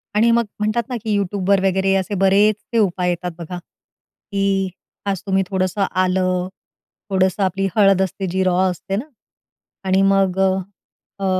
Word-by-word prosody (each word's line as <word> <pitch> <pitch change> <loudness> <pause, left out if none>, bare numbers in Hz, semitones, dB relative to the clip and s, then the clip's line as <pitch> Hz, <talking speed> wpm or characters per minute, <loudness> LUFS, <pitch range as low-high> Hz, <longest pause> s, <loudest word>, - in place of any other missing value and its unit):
आणि 230 +2 +4
मग 235 -1 +3
म्हणतात 215 +3 0
ना 250 - -3
की 215 -2 0
Youtubeवर 200 0 +1
वगैरे 190 +1 +1
असे 195 +2 -1
बरेचसे 210 +4 +2
उपाय 180 -3 +1
येतात 175 0 -2
बघा. 175 +1 -6
की 195 +2 -4 0.4
आज 195 -3 -1
तुम्ही 190 0 +1
थोडंसं 190 +1 0
आलं, 185 0 +1 0.6
थोडंसं 190 +1 +1
आपली 195 +1 0
हळद 195 -2 +4
असते 190 +1 -2
जी 190 +2 0
रॉ 180 -1 +1
असते 195 +3 -5
ना? 230 +8 -3 0.8
आणि 190 +1 +3
मग 190 -1 +1 0.8
अ, 195 - -2
195 Hz, 145 wpm, -20 LUFS, 185-200 Hz, 0.8 s, आणि